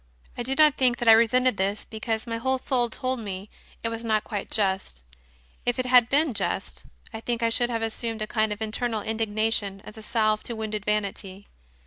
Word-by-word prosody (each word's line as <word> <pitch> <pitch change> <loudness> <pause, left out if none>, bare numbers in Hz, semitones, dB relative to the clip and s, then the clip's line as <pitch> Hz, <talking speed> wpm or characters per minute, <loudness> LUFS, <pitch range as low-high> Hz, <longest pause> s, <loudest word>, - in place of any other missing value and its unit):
I - - -4
do 260 +3 0
not 305 -1 +5
think 250 -2 +3
that 240 - -3
I - - +10
resented 235 +1 +4
this, 200 +2 -1
because 220 +1 -3
my 230 -1 -3
whole 260 +3 0
soul 250 -2 0
told 255 +2 -3
me 200 -2 -6 0.3
it 230 - 0
was 230 0 -5
not 215 -2 +1
quite 205 -3 -5
just; 190 - 0 0.6
if 245 0 0
it 255 - -1
had 250 -2 +6
been 290 -1 +3
just, - - -2 0.3
I 225 - -5
think 235 0 -2
I 230 - +3
should 240 +1 +1
have 230 -1 -1
assumed 225 0 -3
a - - -1
kind 215 0 0
of 210 +1 -3
internal 220 0 -1
indignation 220 -2 -1
as 215 +1 -10
a - - -9
salve 215 -1 +1
to 235 - -6
wounded 215 -2 -4
vanity. 200 -2 -2
225 Hz, 205 wpm, -26 LUFS, 215-240 Hz, 0.6 s, I